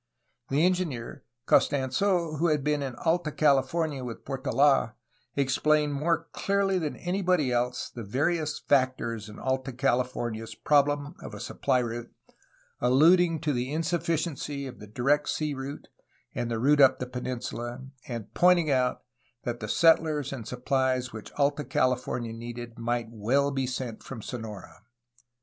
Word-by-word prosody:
The 145 Hz, +5 st, +3 dB
engineer 175 Hz, -10 st, -2 dB, 0.2 s
Costans6, 155 Hz, +4 st, +2 dB
who 170 Hz, -, +3 dB
had 150 Hz, -3 st, +1 dB
been 150 Hz, 0 st, +1 dB
in 135 Hz, -3 st, -4 dB
Alta 165 Hz, -1 st, 0 dB
California 145 Hz, 0 st, +1 dB
with 120 Hz, -2 st, -7 dB
Portold, 135 Hz, -2 st, +2 dB, 0.4 s
explained 145 Hz, +2 st, +2 dB
more 165 Hz, +3 st, 0 dB
clearly 195 Hz, -1 st, +1 dB
than 155 Hz, -4 st, -3 dB
anybody 180 Hz, -6 st, 0 dB
else 125 Hz, 0 st, 0 dB
the 120 Hz, -, -9 dB
various 150 Hz, -, 0 dB
factors 130 Hz, -5 st, 0 dB
in 105 Hz, -, -11 dB
Alta 130 Hz, +1 st, -2 dB
California's 120 Hz, -3 st, -1 dB
problem 145 Hz, +1 st, +2 dB
of -, -, -8 dB
a -, -, -8 dB
supply -, -, 0 dB
route, 120 Hz, -1 st, -3 dB, 0.7 s
alluding 160 Hz, +6 st, +4 dB
to 155 Hz, -3 st, 0 dB
the 125 Hz, +2 st, -2 dB
insufficiency 160 Hz, -3 st, -1 dB
of 125 Hz, -5 st, -9 dB
the 105 Hz, -, -10 dB
direct 140 Hz, +7 st, +1 dB
sea 150 Hz, -1 st, -1 dB
route 135 Hz, +1 st, -6 dB, 0.5 s
and 120 Hz, -, -2 dB
the 115 Hz, -, -1 dB
route 145 Hz, +5 st, +4 dB
up 135 Hz, -, +6 dB
the 125 Hz, -, -3 dB
peninsula, 125 Hz, 0 st, -5 dB, 0.2 s
and 115 Hz, -4 st, -6 dB
pointing 175 Hz, -4 st, +4 dB
out 125 Hz, -1 st, +1 dB, 0.4 s
that 120 Hz, -1 st, -3 dB
the 110 Hz, -, -5 dB
settlers 155 Hz, -3 st, +3 dB
and 120 Hz, -5 st, -6 dB
supphes 130 Hz, 0 st, 0 dB
which 110 Hz, -2 st, -8 dB
Alta 145 Hz, +1 st, +1 dB
Cahfornia 125 Hz, -3 st, 0 dB
needed 120 Hz, 0 st, -8 dB
might 120 Hz, 0 st, -1 dB
well 130 Hz, +6 st, +1 dB
be 135 Hz, -2 st, -1 dB
sent 125 Hz, -3 st, -4 dB
from 115 Hz, -5 st, -8 dB
Sonora. 110 Hz, -6 st, -8 dB
135 Hz, 145 wpm, -28 LUFS, 120-150 Hz, 0.7 s, up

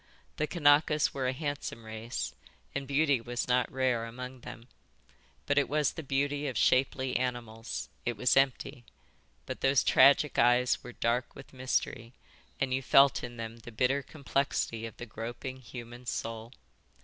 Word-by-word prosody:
The 155 Hz, -, 0 dB
Kanakas 150 Hz, -2 st, +3 dB
were 130 Hz, -2 st, -1 dB
a -, -, +2 dB
handsome 145 Hz, -4 st, -4 dB
race, 110 Hz, +2 st, -5 dB, 0.4 s
and 140 Hz, -1 st, -3 dB
beauty 140 Hz, -2 st, +2 dB
was 120 Hz, +1 st, -3 dB
not 125 Hz, 0 st, +2 dB
rare 130 Hz, -3 st, 0 dB
among 125 Hz, +2 st, -8 dB
them, 115 Hz, 0 st, -10 dB, 0.8 s
but 145 Hz, 0 st, +3 dB
it 140 Hz, -, 0 dB
was 150 Hz, 0 st, +2 dB
the 165 Hz, -, -6 dB
beauty 145 Hz, +1 st, -1 dB
of 130 Hz, -5 st, -3 dB
shapely 130 Hz, 0 st, +2 dB
animals. 120 Hz, -3 st, -4 dB, 0.2 s
It 120 Hz, -2 st, -2 dB
was 125 Hz, +3 st, +3 dB
empty. 135 Hz, -2 st, +1 dB, 0.6 s
But -, -, -6 dB
those 135 Hz, 0 st, +4 dB
tragic 140 Hz, +2 st, +5 dB
eyes 120 Hz, +1 st, +3 dB
were 125 Hz, -, -8 dB
dark 120 Hz, +2 st, -1 dB
with 135 Hz, -, -12 dB
mystery, 125 Hz, -2 st, -2 dB, 0.5 s
and 135 Hz, -1 st, 0 dB
you 130 Hz, -, 0 dB
felt 135 Hz, +1 st, +5 dB
in 120 Hz, 0 st, -7 dB
them 115 Hz, 0 st, -6 dB
the 115 Hz, +1 st, -11 dB
bitter 130 Hz, +5 st, +1 dB
complexity 135 Hz, -5 st, -2 dB
of 115 Hz, -, -12 dB
the 120 Hz, -, -7 dB
groping, 120 Hz, +4 st, -6 dB
human 120 Hz, 0 st, -10 dB
soul. 115 Hz, 0 st, -4 dB
125 Hz, 160 wpm, -30 LUFS, 120-140 Hz, 0.8 s, tragic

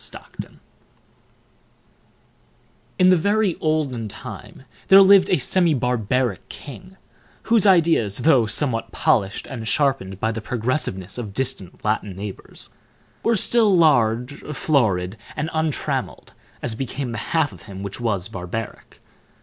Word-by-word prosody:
Stockton -, -, -10 dB, 2.4 s
In 185 Hz, -1 st, +5 dB
the -, -, +6 dB
very 200 Hz, +2 st, +1 dB
olden 145 Hz, -8 st, -1 dB
time 105 Hz, -, -10 dB, 0.2 s
there 195 Hz, 0 st, +8 dB
lived 195 Hz, -1 st, +6 dB
a 185 Hz, -, +3 dB
semi 170 Hz, +3 st, +2 dB
barbaric 125 Hz, -3 st, -1 dB
king, 185 Hz, +7 st, -11 dB, 0.5 s
whose 225 Hz, -2 st, +3 dB
ideas, 165 Hz, -, +3 dB
though 135 Hz, -8 st, +4 dB
somewhat 115 Hz, +1 st, 0 dB
polished 100 Hz, -5 st, 0 dB
and 115 Hz, -5 st, -7 dB
sharpened 130 Hz, -11 st, 0 dB
by 110 Hz, -, 0 dB
the 115 Hz, 0 st, -5 dB
progressiveness 115 Hz, -4 st, -3 dB
of 105 Hz, -4 st, -7 dB
distant 130 Hz, -9 st, -3 dB
Latin 105 Hz, -2 st, -1 dB
neighbors, 100 Hz, 0 st, -9 dB, 0.5 s
were 230 Hz, -, +2 dB
still 215 Hz, -1 st, +3 dB
large, 125 Hz, -4 st, +2 dB, 0.2 s
florid, 110 Hz, -, +1 dB, 0.2 s
and 155 Hz, +2 st, -3 dB
untrammeled, 160 Hz, -2 st, -2 dB, 0.3 s
as 120 Hz, -, -1 dB
became 130 Hz, +2 st, -4 dB
the 115 Hz, -, -4 dB
half 155 Hz, +4 st, 0 dB
of -, -, -14 dB
him 95 Hz, 0 st, -7 dB
which 100 Hz, +3 st, -6 dB
was 100 Hz, -6 st, -1 dB
barbaric. 105 Hz, +2 st, -7 dB
125 Hz, 125 wpm, -22 LUFS, 105-160 Hz, 2.4 s, there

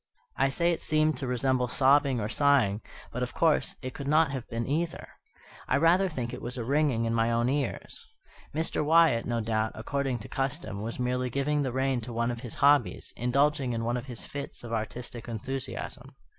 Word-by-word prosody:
I 135 Hz, -, +2 dB
say 170 Hz, +5 st, +1 dB
it 170 Hz, -, -2 dB
seemed 155 Hz, 0 st, +2 dB
to 135 Hz, -, -3 dB
resemble 125 Hz, 0 st, +1 dB
sobbing 135 Hz, 0 st, +3 dB
or 105 Hz, -, -1 dB
sighing, 120 Hz, -5 st, +3 dB, 0.3 s
but, 125 Hz, -, -3 dB
of 125 Hz, -, -3 dB
course, 160 Hz, -3 st, +2 dB
it 130 Hz, 0 st, -4 dB
could 140 Hz, -, -6 dB
not 155 Hz, 0 st, +4 dB
have 130 Hz, -3 st, -5 dB
been 115 Hz, 0 st, -2 dB
either. 160 Hz, +4 st, -2 dB, 0.6 s
I 130 Hz, -, +3 dB
rather 175 Hz, +5 st, +4 dB
think 120 Hz, -6 st, -4 dB
it -, -, -6 dB
was 125 Hz, +2 st, -5 dB
a 120 Hz, -, -2 dB
ringing 135 Hz, -2 st, +1 dB
in 115 Hz, -, 0 dB
my 115 Hz, 0 st, +2 dB
own 120 Hz, +1 st, +2 dB
ears. 140 Hz, +1 st, -3 dB, 0.4 s
Mr. 160 Hz, 0 st, 0 dB
Wyatt, 160 Hz, -6 st, +4 dB
no 120 Hz, -1 st, 0 dB
doubt, 110 Hz, 0 st, -1 dB
according 135 Hz, +3 st, -2 dB
to -, -, -7 dB
custom, 135 Hz, -, -3 dB
was 115 Hz, +2 st, -4 dB
merely 125 Hz, 0 st, 0 dB
giving 140 Hz, +3 st, 0 dB
the 130 Hz, -3 st, -1 dB
rein 130 Hz, -1 st, 0 dB
to 120 Hz, +1 st, -7 dB
one 115 Hz, +1 st, 0 dB
of 120 Hz, -, -5 dB
his 120 Hz, -3 st, -6 dB
hobbies, 140 Hz, -3 st, +3 dB
indulging 135 Hz, +1 st, +1 dB
in 115 Hz, 0 st, -2 dB
one 120 Hz, +1 st, 0 dB
of 125 Hz, +2 st, -4 dB
his 120 Hz, -3 st, -6 dB
fits 140 Hz, -3 st, -7 dB
of 115 Hz, -1 st, -6 dB
artistic 115 Hz, +2 st, -4 dB
enthusiasm. 125 Hz, +3 st, -5 dB
130 Hz, 200 wpm, -28 LUFS, 120-145 Hz, 0.6 s, not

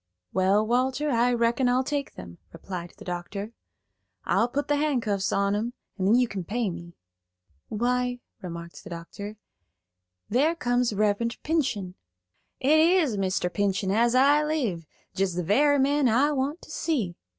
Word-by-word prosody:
"Well, 195 Hz, +3 st, +3 dB
Walter, 260 Hz, +5 st, +1 dB
I 240 Hz, 0 st, +3 dB
reckon 235 Hz, +2 st, +2 dB
I'll 255 Hz, +1 st, +2 dB
take 280 Hz, 0 st, -3 dB
them," 85 Hz, -2 st, -10 dB
replied 175 Hz, 0 st, -7 dB
the -, -, -12 dB
doctor. 190 Hz, +4 st, -5 dB, 0.7 s
"I'll 230 Hz, -, +2 dB
put 275 Hz, +4 st, -2 dB
the 290 Hz, -, +2 dB
handcuffs 230 Hz, -10 st, 0 dB
on 200 Hz, 0 st, +1 dB
'em, 230 Hz, +4 st, -2 dB, 0.2 s
and 190 Hz, -2 st, -1 dB
then 215 Hz, -, +5 dB
you 250 Hz, 0 st, +4 dB
can 195 Hz, -4 st, -5 dB
pay 220 Hz, +2 st, -1 dB
me." 170 Hz, 0 st, -9 dB, 0.7 s
"Why," 245 Hz, +2 st, 0 dB, 0.2 s
remarked 170 Hz, -1 st, -8 dB
the 205 Hz, -, -10 dB
doctor, 200 Hz, +5 st, -8 dB, 0.9 s
"there 290 Hz, +9 st, +2 dB
comes 245 Hz, -5 st, +1 dB
Reverend 210 Hz, +3 st, 0 dB
Pinchen." 250 Hz, -, -1 dB, 0.7 s
"It 295 Hz, +4 st, +4 dB
is 325 Hz, -, +4 dB
Mr. 185 Hz, -2 st, -1 dB
Pinchen 195 Hz, -1 st, 0 dB
as 235 Hz, +4 st, +3 dB
I 285 Hz, +3 st, +5 dB
live; 240 Hz, -, -2 dB, 0.3 s
jest 190 Hz, -2 st, 0 dB
the 180 Hz, -, -1 dB
very 285 Hz, -, +4 dB
man 280 Hz, -1 st, +3 dB
I 265 Hz, +7 st, +3 dB
want 285 Hz, +4 st, -2 dB
to -, -, -12 dB
see." 230 Hz, -, -1 dB
235 Hz, 155 wpm, -26 LUFS, 195-270 Hz, 0.9 s, then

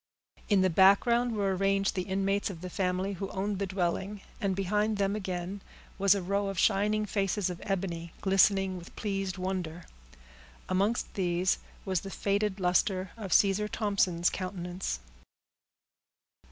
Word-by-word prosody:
In 200 Hz, -3 st, +4 dB
the 185 Hz, -, +4 dB
background 230 Hz, +7 st, +4 dB
were 195 Hz, -2 st, +1 dB
arranged 195 Hz, +1 st, +1 dB
the 185 Hz, -, -1 dB
inmates 195 Hz, +2 st, 0 dB
of 170 Hz, -4 st, -8 dB
the 180 Hz, 0 st, -6 dB
family 185 Hz, +2 st, -1 dB
who 195 Hz, +1 st, -5 dB
owned 195 Hz, +1 st, -2 dB
the 200 Hz, -, -1 dB
dwelling, 190 Hz, +2 st, -2 dB, 0.2 s
and 195 Hz, -2 st, 0 dB
behind 210 Hz, +3 st, 0 dB
them, 200 Hz, 0 st, +1 dB
again, 190 Hz, -1 st, -4 dB, 0.4 s
was 200 Hz, 0 st, +5 dB
a 195 Hz, -, -2 dB
row 200 Hz, +2 st, 0 dB
of 195 Hz, -1 st, -4 dB
shining 210 Hz, +3 st, +2 dB
faces 195 Hz, -2 st, 0 dB
of 175 Hz, -, -7 dB
ebony, 175 Hz, -4 st, -3 dB
glistening 195 Hz, -1 st, +3 dB
with 175 Hz, -, -12 dB
pleased 195 Hz, -3 st, -2 dB
wonder. 180 Hz, -3 st, -3 dB, 0.8 s
Amongst 200 Hz, +5 st, 0 dB
these 180 Hz, -1 st, +1 dB, 0.3 s
was 185 Hz, -4 st, 0 dB
the 195 Hz, -, -7 dB
faded 200 Hz, 0 st, -1 dB
luster 185 Hz, +1 st, +1 dB
of 205 Hz, -5 st, -7 dB
Caesar 200 Hz, +4 st, +4 dB
Thompson's 195 Hz, -6 st, +1 dB
countenance. 180 Hz, -, -4 dB
195 Hz, 145 wpm, -30 LUFS, 185-200 Hz, 0.8 s, was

